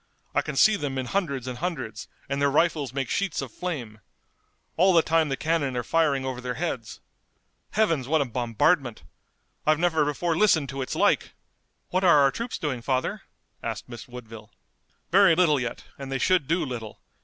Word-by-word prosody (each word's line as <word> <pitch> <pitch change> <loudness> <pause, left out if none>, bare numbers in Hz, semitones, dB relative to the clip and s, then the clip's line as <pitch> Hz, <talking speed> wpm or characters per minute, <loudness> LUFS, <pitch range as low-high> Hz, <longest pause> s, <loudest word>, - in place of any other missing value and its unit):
I - - +3
can 150 - -6
see 215 +8 +5
them 140 -6 -3
in 130 - -2
hundreds 140 -6 -2
and 125 -1 -5
hundreds, 130 - -4 0.2
and 140 0 -2
their 140 - +4
rifles 150 -3 +1
make 135 -1 -2
sheets 195 +2 -1
of 135 -4 -5
flame. 130 -12 -5 0.8
All 185 +3 +4
the 165 - +6
time 160 -1 +2
the 135 - -1
cannon 150 -5 0
are 120 - -1
firing 145 -2 +1
over 130 -1 -4
their 125 0 -4
heads. 120 -10 -4 0.7
Heavens, 165 - +1
what 160 +2 +2
a 140 - +1
bombardment! 120 - 0 0.6
I've 155 0 +3
never 160 -2 +2
before 160 +3 -1
listened 160 -7 +3
to 135 0 -4
its 130 - -3
like!" - - +2 0.6
"What 185 +1 +1
are 170 -5 +6
our 135 -1 +4
troops 235 - -4
doing, 130 -6 -3
father?" 130 +1 -1 0.4
asked - - -5
Miss 120 +2 -9
Woodville. 115 -3 -10 0.6
"Very 190 -2 +6
little 160 -5 +3
yet, 125 -2 -4 0.2
and 135 -1 -7
they 135 - 0
should 175 +1 +2
do 170 +2 +1
little. 115 -5 -7
140 Hz, 185 wpm, -26 LUFS, 125-165 Hz, 0.8 s, the